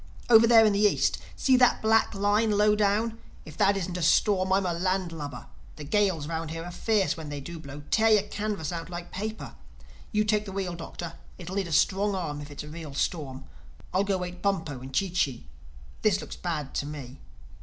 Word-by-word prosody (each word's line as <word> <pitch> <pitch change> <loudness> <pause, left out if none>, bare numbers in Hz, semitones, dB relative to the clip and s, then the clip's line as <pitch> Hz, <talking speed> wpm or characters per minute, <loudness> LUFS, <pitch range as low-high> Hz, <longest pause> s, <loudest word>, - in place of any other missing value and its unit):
—over 225 0 +8
there 225 -1 +7
in 210 - +4
the 200 - +1
East—see 215 +5 +2
that 250 -1 +4
black 220 0 +2
line, 205 +3 +2
low 210 0 +4
down? 215 +2 +1 0.3
If 155 - -11
that 200 0 +3
isn't 180 -1 -3
a - - -4
storm 185 +3 +3
I'm 195 0 +3
a 175 - 0
land 185 +1 -1
lubber. 145 -6 -7 0.3
The 150 - -8
gales 185 -1 +1
round 165 0 -4
here 165 +1 -5
are 175 - -6
fierce, 210 +1 +1
when 160 -2 -7
they 145 -1 -5
do 165 +4 -8
blow—tear 150 +9 0
your 215 -2 +5
canvas 205 -7 -3
out 165 0 -5
like 175 0 -7
paper. 215 +3 -5 0.6
You 210 -1 +2
take 210 0 +1
the 195 - -7
wheel, 190 -2 -3
Doctor: 170 0 -7 0.2
it'll 180 +1 -7
need 195 -3 -1
a - - -7
strong 195 +5 +2
arm 150 -6 -3
if 145 - -9
it's 145 - -7
a - - -10
real 155 -2 -8
storm. 135 -5 -2 0.5
I'll 190 +2 +3
go 200 -1 0
wake 180 -1 -6
Bumpo 165 -9 -1
and 130 +1 -9
Chee 185 +7 0
Chee. 140 - -1 0.6
This 200 -2 +3
looks - - -7
bad 155 -6 -4
to 145 - -2
me. 140 -3 -8
180 Hz, 210 wpm, -27 LUFS, 155-205 Hz, 0.6 s, over